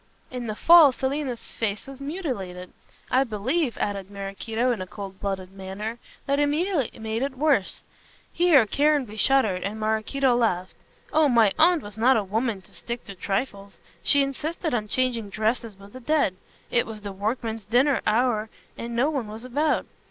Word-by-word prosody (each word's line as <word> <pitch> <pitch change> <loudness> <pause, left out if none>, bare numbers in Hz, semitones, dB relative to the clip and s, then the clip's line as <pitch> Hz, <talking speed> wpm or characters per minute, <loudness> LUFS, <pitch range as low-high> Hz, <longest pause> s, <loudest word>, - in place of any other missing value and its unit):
In 250 -2 -5
the 215 - -3
fall 335 +1 +8
Selina's 265 -1 -3
face 210 -2 -2
was 275 0 -11
much 275 - -6
mutilated. 200 - -5 0.4
I 260 +1 +4
believe," 255 +5 -1
added 200 -2 -2
Maraquito, 205 +5 -2
in 225 -6 -2
a 185 - -5
coldblooded 195 -1 -5
manner, 195 +4 -6 0.3
"that 280 0 +1
Emilia 295 - 0
made 220 +1 -3
it 270 -1 -2
worse" 280 -8 +1 0.5
here 335 -9 +5
Caranby 280 -2 +1
shuddered 220 -6 +2
and 210 +3 -4
Maraquito 220 +5 +1
laughed 185 -6 0 0.4
"oh, 310 -2 +4
my 230 -5 +4
aunt 335 -1 +5
was 205 +1 -9
not 255 +3 +5
a 215 - +1
woman 215 0 -2
to - - -20
stick 235 0 -7
at 190 - -12
trifles. 200 -1 -3 0.2
She 285 -1 +4
insisted 310 +4 -3
on 215 -3 -1
changing 235 -3 0
dresses 220 +1 -1
with 200 +1 -15
the 255 - -8
dead. 270 -7 +1 0.4
It 240 - +2
was 215 -2 -8
the 200 - -5
workmen's 220 +2 -3
dinner 250 +5 +3
hour 220 -1 +2 0.3
and 235 0 -6
no 270 +6 +2
one 270 -7 -2
was 220 +3 -8
about. 295 +5 0
235 Hz, 170 wpm, -25 LUFS, 205-275 Hz, 0.5 s, fall